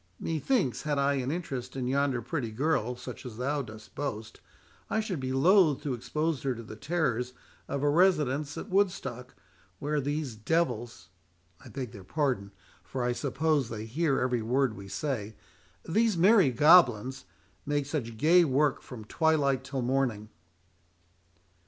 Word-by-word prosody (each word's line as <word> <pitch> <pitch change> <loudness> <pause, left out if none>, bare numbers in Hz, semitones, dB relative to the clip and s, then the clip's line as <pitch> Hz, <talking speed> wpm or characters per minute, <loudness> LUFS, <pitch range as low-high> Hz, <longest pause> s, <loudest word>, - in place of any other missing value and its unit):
"Methinks 160 - 0
had 150 -2 -1
I 140 0 +2
an 125 - -3
interest 135 -6 -4
in 130 -2 -2
yonder 135 -2 0
pretty 130 -2 -3
girl, 125 0 0
such 125 - -9
as 120 -4 -8
thou 140 +4 -1
dost 110 -3 -11
boast, 115 -6 -5 0.5
I 220 - +1
should 205 -7 -3
be 130 0 -3
loth 155 +1 +4
to 140 - -1
expose 150 +4 -2
her 135 -2 -1
to 115 - -8
the 110 - -9
terrors 125 -4 -1 0.3
of 140 0 -3
a - - +3
residence 150 -4 +2
at 220 - -7
Woodstock, 180 - -1 0.4
where 150 +1 -1
these 145 -1 -2
devils—I 95 - -4
beg 130 -5 -5
their 100 - -11
pardon, 125 -5 -1 0.3
for 125 +7 -4
I 120 - +1
suppose 140 0 0
they 110 -1 -5
hear 140 +4 0
every 125 -2 0
word 125 +1 +1
we 100 -2 -10
say—these 145 - -3
merry 190 -2 +6
goblins—make 140 0 +2
such 125 -6 -4
gay 170 +7 +5
work 145 -1 +1
from 115 -5 -10
twilight 140 -2 +1
till 135 -2 -3
morning." 120 -5 0
135 Hz, 145 wpm, -29 LUFS, 120-155 Hz, 0.5 s, merry